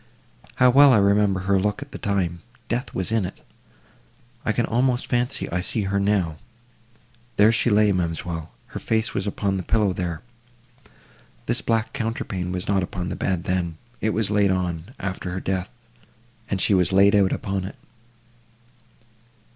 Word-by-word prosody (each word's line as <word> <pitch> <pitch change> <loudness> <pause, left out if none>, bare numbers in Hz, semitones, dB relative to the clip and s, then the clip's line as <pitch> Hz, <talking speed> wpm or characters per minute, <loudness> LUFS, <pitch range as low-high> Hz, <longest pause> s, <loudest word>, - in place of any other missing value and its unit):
How 125 0 +5
well 140 +1 +7
I - - +6
remember 100 -1 +3
her 95 0 +2
look 105 +7 -1
at 145 - -18
the - - -7
time—death 115 +7 -3
was 95 +3 -2
in 110 -2 +2
it!—I 120 +5 -10
can 120 +1 +1
almost 125 +1 +1
fancy 125 +1 -1
I 90 +1 0
see 105 +4 -2
her 100 +1 0
now.—There 115 +4 -2
she 120 +1 +2
lay, 105 -1 +4
ma'amselle—her 85 -2 -4
face 110 0 0
was 100 - -2
upon 100 -1 -1
the - - -2
pillow 100 +1 +1
there! 90 -1 -4 1.2
This - - 0
black 115 -1 0
counterpane 100 -5 -3
was 90 0 -4
not 100 -1 +2
upon 90 0 -4
the - - -3
bed 90 -3 -1
then; 90 -3 -1 0.2
it 110 - +1
was 110 -1 0
laid 105 -1 +3
on, 90 -3 -1
after 95 -1 -4
her 95 - -2
death, 95 -1 -2 0.8
and 100 - -1
she 100 - +2
was 90 -2 +3
laid 100 +2 +5
out 100 -2 +4
upon 95 -1 -2
it." 95 - -7
100 Hz, 155 wpm, -23 LUFS, 90-115 Hz, 1.2 s, well